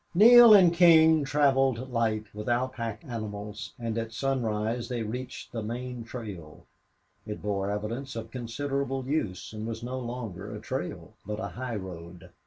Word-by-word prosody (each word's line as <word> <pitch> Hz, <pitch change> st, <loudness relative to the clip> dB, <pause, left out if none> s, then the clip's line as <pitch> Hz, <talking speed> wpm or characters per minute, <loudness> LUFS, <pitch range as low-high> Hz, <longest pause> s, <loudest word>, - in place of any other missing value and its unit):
10 210 Hz, +4 st, +9 dB
Neale 240 Hz, -2 st, +10 dB
and 180 Hz, -4 st, +6 dB
King 160 Hz, -3 st, +6 dB
traveled 135 Hz, -3 st, +2 dB
light, 110 Hz, -2 st, 0 dB
without 120 Hz, +5 st, -1 dB
pack 115 Hz, -2 st, -5 dB
animals, 105 Hz, -3 st, -6 dB
and 115 Hz, -1 st, -3 dB
at 115 Hz, 0 st, -4 dB
sunrise 115 Hz, -2 st, -1 dB
they 120 Hz, -2 st, -2 dB
reached 125 Hz, +4 st, -6 dB
the 115 Hz, -, -4 dB
main 120 Hz, +2 st, -5 dB
trail. 105 Hz, -10 st, -9 dB, 0.6 s
It 105 Hz, -, -5 dB
bore 100 Hz, -1 st, -2 dB
evidence 115 Hz, +6 st, -4 dB
of 115 Hz, -, -6 dB
considerable 135 Hz, +2 st, -3 dB
use 120 Hz, -10 st, -2 dB
and 110 Hz, +1 st, -5 dB
was 115 Hz, 0 st, -5 dB
no 130 Hz, +2 st, -4 dB
longer 110 Hz, -5 st, -6 dB
a -, -, -6 dB
trail, 110 Hz, -, -5 dB
but 105 Hz, +2 st, -5 dB
a -, -, -4 dB
highroad. 95 Hz, -7 st, -7 dB
115 Hz, 155 wpm, -28 LUFS, 105-130 Hz, 0.6 s, Neale